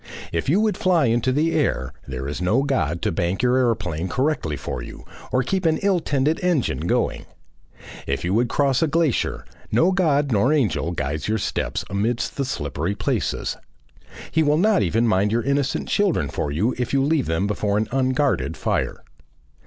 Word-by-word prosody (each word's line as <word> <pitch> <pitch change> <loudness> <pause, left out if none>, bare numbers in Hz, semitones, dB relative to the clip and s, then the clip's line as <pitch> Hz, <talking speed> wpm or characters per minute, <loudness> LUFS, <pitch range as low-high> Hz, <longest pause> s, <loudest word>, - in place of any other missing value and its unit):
If 85 +8 -1
you 175 +7 +4
would 215 -1 +1
fly 175 -5 +3
into 120 +2 +1
the 155 +5 +1
air, 65 0 0
there 65 0 -5
is 75 +5 -4
no 110 +9 +2
God 85 - -1
to - - +1
bank 85 +5 -1
your 125 +1 +3
aeroplane 95 -9 0
correctly 130 - -1
for 60 - -5
you - - -10 0.3
or 130 0 +2
keep 190 +8 -1
an 160 -2 +2
ill 195 -3 +3
tended 145 0 0
engine 175 -8 0
going; - - 0 0.8
if 70 +4 -2
you 90 - 0
would 120 +2 +2
cross 135 -1 +1
a 160 - +3
glacier, 160 -4 0 0.3
no 175 +3 +4
God 150 -7 +2
nor 115 +6 +3
angel 105 - +1
guides 75 -2 -3
your 110 +1 +1
steps - - -2
amidst 105 +6 -1
the 140 - -1
slippery 80 - -3
places. - - -2 0.7
He 160 - +2
will 150 -1 +3
not 210 +3 +3
even 115 +2 +1
mind 105 -1 +2
your 115 +1 +1
innocent 140 +1 0
children 185 - +1
for 75 -1 -2
you 105 - 0
if 125 - -2
you 135 -1 +3
leave 145 -1 +1
them 80 +4 0
before 105 0 0
an 110 0 0
unguarded 130 +1 0
fire. - - -2
125 Hz, 185 wpm, -22 LUFS, 90-145 Hz, 0.8 s, you